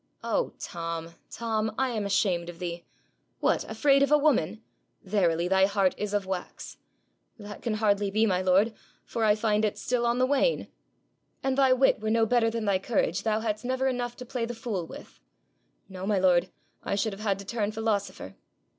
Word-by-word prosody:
'Oh, - - -1
Tom, 165 -1 -5 0.2
Tom! 220 -2 -2
I 265 -1 +1
am 215 -4 -2
ashamed 185 -4 +1
of 175 - -9
thee. 170 -1 -5 0.6
What! - - +1
Afraid 275 -2 +3
of 280 - +2
a 300 - +7
woman? 225 - +1 0.4
Verily, 175 -4 +1
thy 190 +1 +4
heart 195 -2 +2
is 210 -1 -4
of 205 -2 0
wax.' 185 -1 -6 0.6
'That 205 -2 -9
can 230 -3 -1
hardly 205 -2 +1
be, 215 +3 +2
my 185 -4 +1
lord, 190 +5 +3 0.3
for 230 - -3
I 210 -1 +5
find 215 -1 +1
it 210 - 0
still 240 -1 0
on 235 +1 +1
the 255 - +3
wane.' 285 - +1 0.7
'An' 270 0 +1
thy 265 -1 +4
wit 265 +1 +3
were 215 0 -2
no 225 0 +3
better 230 0 +3
than 225 -1 -3
thy 195 -2 +2
courage, 195 -4 0
thou 220 -1 0
hadst 215 -1 -2
never 260 +1 -1
had 265 - +2
enough 245 -1 -3
to 250 - -9
play 245 0 -3
the 240 - -5
fool 215 -7 -4
with.' - - -12 0.7
'No, 190 0 -7
my 205 -1 +2
lord; 185 -1 +3 0.3
I - - -1
should 210 +1 -1
have 195 - -9
had 200 -3 0
to 200 - -9
turn 215 0 -2
philosopher.' 215 -2 -2
215 Hz, 200 wpm, -27 LUFS, 190-235 Hz, 0.7 s, a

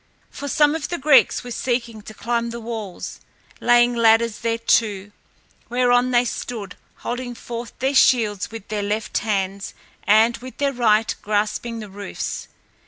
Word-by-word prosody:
For 285 - -6
some 295 +1 +3
of 320 -2 -3
the 345 - -2
Greeks 275 -2 +4
were 245 - -8
seeking 235 -2 -2
to 215 +1 -11
climb 235 +1 -1
the 235 0 -6
walls, 220 -5 -6 0.4
laying 240 0 +4
ladders 230 -1 +3
thereto, 225 -3 +1 0.6
whereon 245 0 +3
they 245 0 +3
stood, 220 -5 -5 0.2
holding 245 0 -5
forth 235 -1 -7
their 265 +2 0
shields 225 -7 +3
with 225 -3 -9
their 210 -1 -2
left 210 +2 -1
hands 200 -2 -2 0.3
and 220 +3 +4
with 255 +2 -11
their 280 -1 0
right 225 -3 +2
grasping 215 +2 -1
the 210 - -9
roofs. 200 +1 -5
230 Hz, 150 wpm, -22 LUFS, 215-245 Hz, 0.6 s, Greeks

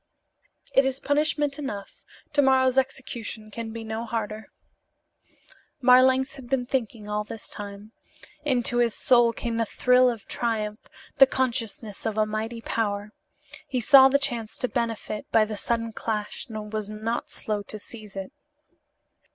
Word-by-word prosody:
"It 270 - +6
is 265 0 -1
punishment 295 0 +1
enough. 205 -9 -6 0.3
To 290 - +5
morrow's 260 -1 +4
execution 240 -5 -2
can 230 +1 -5
be 230 0 -6
no 220 +1 -4
harder." 220 -1 -4 1.3
Marlanx 260 +2 +5
had 250 -3 -11
been 260 -2 +1
thinking 230 -4 -2
all 210 0 -1
this 220 +1 -7
time. 205 +1 -7 0.5
Into 245 -4 +1
his 240 -2 +2
soul 240 -2 +4
came 230 0 -3
the 230 - +2
thrill 250 +2 +4
of 230 -4 -5
triumph, 215 -2 -3 0.3
the 270 - +10
consciousness 230 -5 -2
of 220 -1 -3
a 215 - +4
mighty 220 +2 -4
power. 205 -2 -2 0.6
He 255 - -1
saw 265 +3 +8
the 280 - +4
chance 240 -6 -3
to 250 - 0
benefit 230 -3 -3
by 220 -1 +5
the 215 0 -5
sudden 230 +2 -1
clash 215 -1 -4
and 220 -2 -7
he 215 - -4
was 215 -1 -3
not 220 +2 -3
slow 210 -1 -2
to 210 +1 -7
seize 210 -1 -11
it. 195 -1 -5
230 Hz, 155 wpm, -26 LUFS, 215-255 Hz, 1.3 s, the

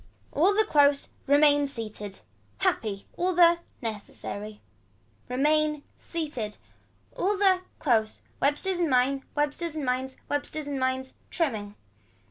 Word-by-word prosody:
All 370 +7 +3
the 435 +1 +4
close. 285 -5 +3 0.2
Remain 290 0 +5
seated. 215 -6 -7 0.4
Happy. 200 -3 0
All 365 +1 +1
the. 340 -1 +6 0.2
Necessity. 210 -1 -6 0.7
Remain 300 +3 +2
seated. 290 -11 -4 0.6
All 400 +2 +1
the, 385 -2 +4 0.2
close. 220 -6 +1 0.2
Websters 345 +6 +1
and 340 -3 +2
mines, 260 +1 +3
websters 295 +2 -1
and 300 -3 -2
mines. 255 +1 -1
Websters 290 +1 -2
and 285 -1 -3
mines. 260 0 -1 0.2
Trimming. 215 - -2
285 Hz, 115 wpm, -27 LUFS, 250-315 Hz, 0.7 s, the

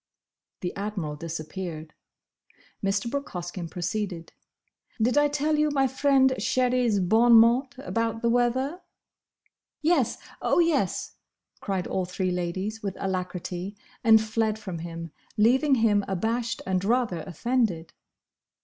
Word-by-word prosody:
'" - - -63
The 180 - -3
Admiral 195 -7 -3
disappeared. 160 0 -6 0.9
Mr. 195 +3 0
Brooke 280 +4 -3
Hoskyn 175 -1 -5
proceeded, 180 0 -4 0.7
"Did 240 +4 +2
I 290 0 +5
tell 295 +1 0
you 305 0 +3
my 275 -2 +2
friend 265 0 +3
Sherry's 250 -4 +2
bonn 225 +6 +4
mott 235 +4 +5
about 230 -4 -2
the 235 - +3
weather?" 260 +8 +1 1.0
"Yes! 305 -7 +2 0.2
Oh, - - +2
yes!" 320 - +1 0.4
cried 190 -3 -2
all 185 - -1
three 185 +1 -2
ladies, 185 +5 -3
with 195 -2 -4
alacrity, 185 0 -4 0.3
and 220 -2 +7
fled 220 0 0
from 190 -6 -6
him, 165 -1 -7 0.3
leaving 265 +6 +4
him 215 -4 +3
abashed 225 +5 -2
and 185 -1 0
rather 225 -4 +1
offended. 185 - -1
215 Hz, 125 wpm, -26 LUFS, 180-250 Hz, 1.0 s, and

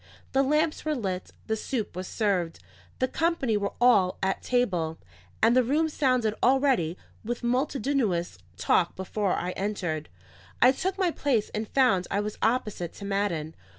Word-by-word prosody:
The 270 - +3
lamps 300 +3 +1
were 310 -1 0
lit, 190 -7 -3 0.2
the 220 - 0
soup 220 -2 -3
was 185 0 -5
served, 185 -7 0 0.4
the 255 - +1
company 320 -7 0
were 200 -1 -1
all 230 -7 +4
at 190 0 0
table, 180 -11 0 0.5
and 230 +2 +5
the 255 - +6
room 300 +6 +1
sounded 255 -7 +1
already 255 - +3 0.3
with 240 +2 -4
multitudinous 245 - 0 0.2
talk 170 - +2
before 190 +1 -1
I 180 - -2
entered. 180 -6 -3 0.5
I 250 - +7
took 375 +8 -2
my 370 -3 +2
place 260 -9 0
and 215 0 -3
found 205 -10 +3
I 200 - 0
was 210 0 -4
opposite 215 -7 0
to 200 - -9
Madden. 195 -6 -1
220 Hz, 155 wpm, -27 LUFS, 185-265 Hz, 0.5 s, I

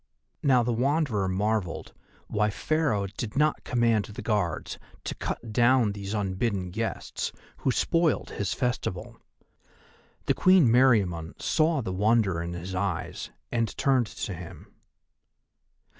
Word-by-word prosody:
Now 130 -4 +4
the 120 0 0
Wanderer 125 -5 +1
marvelled 100 -1 -1 0.3
why 105 0 +1
Pharaoh 125 -3 0
did 105 +4 -6
not 150 +1 +2
command 115 -4 +2
the 105 - -8
Guards 100 -8 -1 0.2
to - - -3
cut 115 -2 -5
down 120 -1 +4
these 100 +1 -5
unbidden 95 -1 -1
guests, 115 +4 -3 0.3
who - - -1
spoiled 165 +5 +1
his 100 -1 -2
festival. 125 -8 -3 1.0
The - - +3
Queen 185 -6 +5
Meriamun 100 -10 +3
saw 155 -2 +2
the 95 - -3
wonder 105 -3 +2
in 85 +1 -4
his 90 +2 -6
eyes 95 -2 -3 0.2
and 115 -2 -1
turned 130 -4 +2
to 100 - -5
him. 85 -1 -10
110 Hz, 130 wpm, -27 LUFS, 95-125 Hz, 1.0 s, Queen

